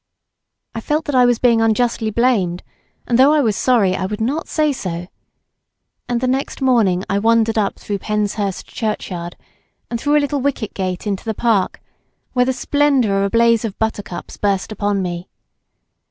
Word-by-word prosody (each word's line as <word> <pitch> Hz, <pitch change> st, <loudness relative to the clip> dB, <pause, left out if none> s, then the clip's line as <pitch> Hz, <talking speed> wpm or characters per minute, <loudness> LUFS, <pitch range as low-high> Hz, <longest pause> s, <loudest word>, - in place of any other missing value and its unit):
I 225 Hz, -, -5 dB
felt 300 Hz, +6 st, -1 dB
that 290 Hz, -, -3 dB
I 250 Hz, -1 st, +5 dB
was 245 Hz, -1 st, +3 dB
being 235 Hz, -2 st, +3 dB
unjustly 225 Hz, 0 st, +1 dB
blamed, 210 Hz, -7 st, +1 dB, 0.4 s
and 240 Hz, 0 st, +1 dB
though 275 Hz, +3 st, +6 dB
I 305 Hz, -, +4 dB
was 220 Hz, -6 st, +1 dB
sorry 210 Hz, -8 st, +2 dB
I 190 Hz, -, -2 dB
would 210 Hz, +1 st, -5 dB
not 275 Hz, +9 st, -1 dB
say 305 Hz, -1 st, +1 dB
so, 175 Hz, -8 st, -5 dB, 1.0 s
and 240 Hz, -1 st, 0 dB
the 255 Hz, -, 0 dB
next 265 Hz, +2 st, -1 dB
morning 225 Hz, -9 st, +2 dB
I 195 Hz, +1 st, 0 dB
wandered 225 Hz, +1 st, +2 dB
up 210 Hz, -3 st, 0 dB
through 205 Hz, -1 st, -4 dB
Penshurst 205 Hz, -1 st, -2 dB
churchyard, 180 Hz, -6 st, -4 dB, 0.6 s
and 235 Hz, -1 st, -3 dB
through 295 Hz, +1 st, +3 dB
a 295 Hz, -, +2 dB
little 285 Hz, -1 st, -1 dB
wicket 255 Hz, -5 st, -2 dB
gate 185 Hz, -1 st, -3 dB
into 200 Hz, -2 st, -2 dB
the 220 Hz, -2 st, -3 dB
park, 215 Hz, -5 st, +1 dB, 0.5 s
where 250 Hz, -1 st, +3 dB
the 260 Hz, -, +1 dB
splendour 260 Hz, -6 st, +1 dB
of 200 Hz, -, +2 dB
a -, -, 0 dB
blaze 230 Hz, +1 st, +3 dB
of 220 Hz, -4 st, -4 dB
buttercups, 210 Hz, -5 st, -4 dB
burst 200 Hz, 0 st, -1 dB
upon 205 Hz, -2 st, -1 dB
me. 175 Hz, 0 st, -5 dB
225 Hz, 180 wpm, -19 LUFS, 200-250 Hz, 1.0 s, though